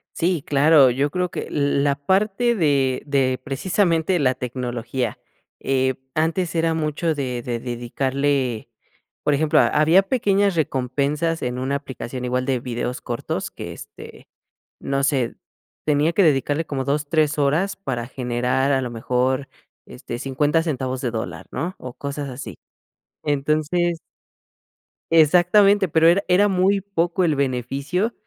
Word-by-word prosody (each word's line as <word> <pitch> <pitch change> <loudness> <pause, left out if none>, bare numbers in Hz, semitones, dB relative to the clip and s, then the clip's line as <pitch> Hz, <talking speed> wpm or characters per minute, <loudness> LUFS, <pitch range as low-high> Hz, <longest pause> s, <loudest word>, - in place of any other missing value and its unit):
Sí, 170 -3 0
claro, 145 -2 +5
yo 140 +4 0
creo 180 +2 -2
que - - -5
l 140 -1 0
la 140 -1 +2
parte 200 - +1
de 140 -7 +1
de 130 -2 +1
precisamente 170 +3 +1
la 130 -2 +2
tecnología, 125 -1 -3 0.4
eh, 130 -1 0 0.2
antes 165 +2 0
era 165 -1 +1
mucho 160 +1 -1
de 125 -4 -3
de 120 -1 -3
dedicarle 130 +1 -1 0.6
por 150 - +3
ejemplo, 150 +1 +3
había 160 +5 +4
pequeñas 200 -4 +1
recompensas 145 +3 -1
en 125 0 -2
una 135 +2 -1
aplicación 130 -2 -7
igual 125 +1 -1
de 130 -3 0
videos 125 0 -4
cortos 120 -2 -4
que, - - -7
este, - - -12 0.5
no 135 0 -1
sé, 130 -5 0 0.5
tenía 150 +2 +2
que 200 - +3
dedicarle 145 +1 +2
como 135 -2 -3
2, 145 +1 -1
3 155 -2 +2
horas 155 +8 +1
para 125 -10 -4
generar 125 +2 -1
a 135 - +2
lo 125 - -4
mejor, 125 +3 -1 0.4
este, 120 - -7
50 145 +4 +1
centavos 130 -5 -3
de 125 - -1
dólar, 95 -6 -5
¿no?, 180 +3 -3
o 125 -1 -8
cosas 140 0 -5
así. 125 +2 -8 0.7
Entonces 155 +4 0 1.1
exactamente, 180 +5 +5
pero 160 +1 +4
era 190 +4 +4
era 185 +3 +4
muy 195 +1 +2
poco 180 -2 -1
el 155 -4 +2
beneficio, 140 - -1
145 Hz, 140 wpm, -22 LUFS, 130-165 Hz, 1.1 s, claro